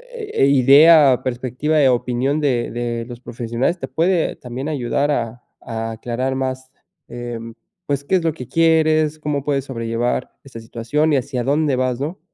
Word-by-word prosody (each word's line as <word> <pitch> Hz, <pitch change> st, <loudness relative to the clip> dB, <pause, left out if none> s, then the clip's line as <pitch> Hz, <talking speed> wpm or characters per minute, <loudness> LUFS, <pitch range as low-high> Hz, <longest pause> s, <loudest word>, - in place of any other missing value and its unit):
eh, 425 Hz, -, 0 dB
idea, 140 Hz, +1 st, +6 dB
perspectiva 130 Hz, +5 st, -1 dB
de 135 Hz, -3 st, +5 dB
opinión 125 Hz, +3 st, 0 dB
de 125 Hz, -5 st, 0 dB
de 120 Hz, 0 st, -3 dB
los 120 Hz, -1 st, -8 dB
profesionales 120 Hz, +6 st, -2 dB
te -, -, -5 dB
puede 170 Hz, 0 st, +1 dB
también 130 Hz, +4 st, -6 dB
ayudar 145 Hz, 0 st, 0 dB
a 120 Hz, -2 st, -3 dB, 0.2 s
a 115 Hz, 0 st, -4 dB
aclarar 120 Hz, +4 st, -3 dB
más, 130 Hz, 0 st, -4 dB, 0.4 s
em, 120 Hz, -1 st, -7 dB, 0.3 s
pues 140 Hz, -1 st, -1 dB
qué 190 Hz, -, +1 dB
es 180 Hz, -, +1 dB
lo 165 Hz, -1 st, +1 dB
que 125 Hz, -6 st, -9 dB
quieres, 155 Hz, -1 st, +2 dB
cómo 150 Hz, -2 st, -2 dB
puedes 140 Hz, -2 st, -1 dB
sobrellevar 115 Hz, -1 st, -2 dB
esta 130 Hz, -4 st, -10 dB
situación 120 Hz, +7 st, -1 dB
y -, -, +4 dB
hacia 130 Hz, -1 st, -3 dB
dónde 145 Hz, +1 st, +1 dB
vas, 130 Hz, -1 st, -1 dB
¿no? 155 Hz, +8 st, -4 dB
130 Hz, 165 wpm, -20 LUFS, 120-150 Hz, 0.4 s, idea